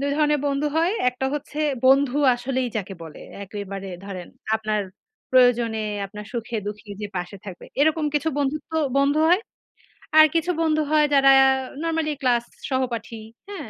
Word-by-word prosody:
২ 280 0 -1
ধরনের 300 -2 +2
বন্ধু 280 +1 0
হয়। 335 +4 +2 0.2
একটা 250 +1 -3
হচ্ছে 295 +1 -6 0.3
বন্ধু 270 0 +4 0.2
আসলেই 255 +1 -2
যাকে 195 -2 -4
বলে। 160 -2 -10 0.2
একেবারে 195 -1 -7 0.2
ধরেন, 185 -3 -7 0.3
আপনার 215 -1 -1 0.5
প্রয়োজনে, 240 -3 +4 0.3
আপনার 210 +1 -9
সুখে-দুঃখে 210 -3 -5
যে 210 - -2
পাশে 180 +2 -5
থাকবে, 185 -3 -9 0.2
এরকম 315 +1 +2
কিছু 295 +2 +1
বন্ধুত্ব 285 +2 -2 0.3
বন্ধু 280 +2 +2
হয়। 360 +4 +4 0.8
আর 310 - +10
কিছু 330 +2 +1
বন্ধু 310 -1 +2
হয় 305 -1 +5
যারা 275 -1 +6 0.5
নরমালি 325 -2 -1
ক্লাস 245 -3 +2 0.3
সহপাঠী, 240 -3 -2 0.3
হ্যাঁ। 375 -8 -7
260 Hz, 145 wpm, -23 LUFS, 215-300 Hz, 0.8 s, আর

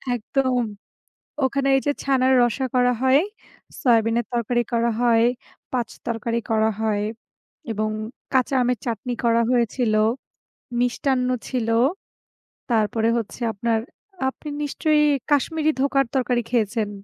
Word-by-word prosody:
একদম 255 +2 0 0.8
ওখানে 275 +1 +1
এই - - +2
যে 290 - +3
ছানার 265 -1 +2
রসা 240 +3 +1
করা 250 0 +4
হয়, 265 +3 +5 0.6
সয়াবিনের 230 -2 +2
তরকারি 240 +1 +1
করা 235 0 +2
হয়, 230 -1 +4 0.5
৫ 240 -3 -1 0.2
তরকারি 235 0 -1
করা 220 0 +3
হয় 210 -2 0 0.7
এবং 215 0 -1 0.4
কাঁচা 260 +1 +2
আমের 245 -2 +1
চাটনি 235 +2 -2
করা 235 0 +4
হয়েছিল, 235 -2 +1 0.9
মিষ্টান্ন 250 +1 +1 0.2
ছিল 240 -4 -2 1.0
তারপরে 225 0 +2
হচ্ছে 230 +2 -6
আপনার, 225 +2 0 0.5
আপনি 300 +3 -7
নিশ্চয়ই 300 +1 +2 0.3
কাশ্মীরি 310 +2 +2
ধোকার 275 -1 +2
তরকারি 250 -2 +1
খেয়েছেন? 220 -2 0
240 Hz, 115 wpm, -23 LUFS, 225-260 Hz, 1.0 s, হয়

